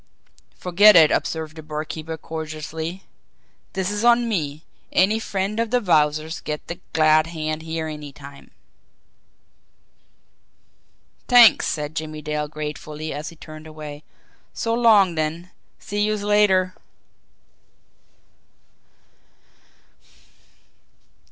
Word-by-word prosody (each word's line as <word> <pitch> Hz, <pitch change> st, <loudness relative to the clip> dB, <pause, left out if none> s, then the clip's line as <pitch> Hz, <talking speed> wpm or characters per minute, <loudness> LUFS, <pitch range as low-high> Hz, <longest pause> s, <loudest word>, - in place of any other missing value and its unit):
"Forget 200 Hz, +4 st, +6 dB
it!" 160 Hz, -3 st, +7 dB
observed 160 Hz, -1 st, -2 dB
the 160 Hz, -, -8 dB
barkeeper 155 Hz, +1 st, -6 dB
cordially. 160 Hz, +3 st, -6 dB, 0.7 s
"Dis 190 Hz, +1 st, -2 dB
is 210 Hz, +1 st, -3 dB
on 240 Hz, 0 st, +4 dB
me. 155 Hz, -8 st, -3 dB, 0.3 s
Any 205 Hz, +4 st, +3 dB
friend 200 Hz, 0 st, -3 dB
of 230 Hz, -1 st, 0 dB
de 250 Hz, +2 st, +2 dB
Wowzer's 155 Hz, -5 st, +1 dB
gets 150 Hz, 0 st, -5 dB
de 170 Hz, -, -7 dB
glad 155 Hz, 0 st, +4 dB
hand 155 Hz, -1 st, -4 dB
here 160 Hz, 0 st, -4 dB
any 150 Hz, -2 st, -7 dB
time." 140 Hz, 0 st, -13 dB, 2.8 s
"T'anks!" 245 Hz, -3 st, +7 dB
said 150 Hz, 0 st, -3 dB
Jimmie 155 Hz, -1 st, -5 dB
Dale 150 Hz, 0 st, -2 dB
gratefully, 150 Hz, +1 st, -6 dB
as 150 Hz, +2 st, -5 dB
he 170 Hz, -, -14 dB
turned 155 Hz, 0 st, -11 dB
away. 150 Hz, -1 st, -9 dB, 0.5 s
"So 230 Hz, -, -1 dB
long, 220 Hz, -6 st, +5 dB
then 165 Hz, +3 st, -3 dB, 0.3 s
see 205 Hz, 0 st, -4 dB
youse 210 Hz, -1 st, -1 dB
later." 200 Hz, -3 st, +3 dB
160 Hz, 105 wpm, -22 LUFS, 155-195 Hz, 2.8 s, it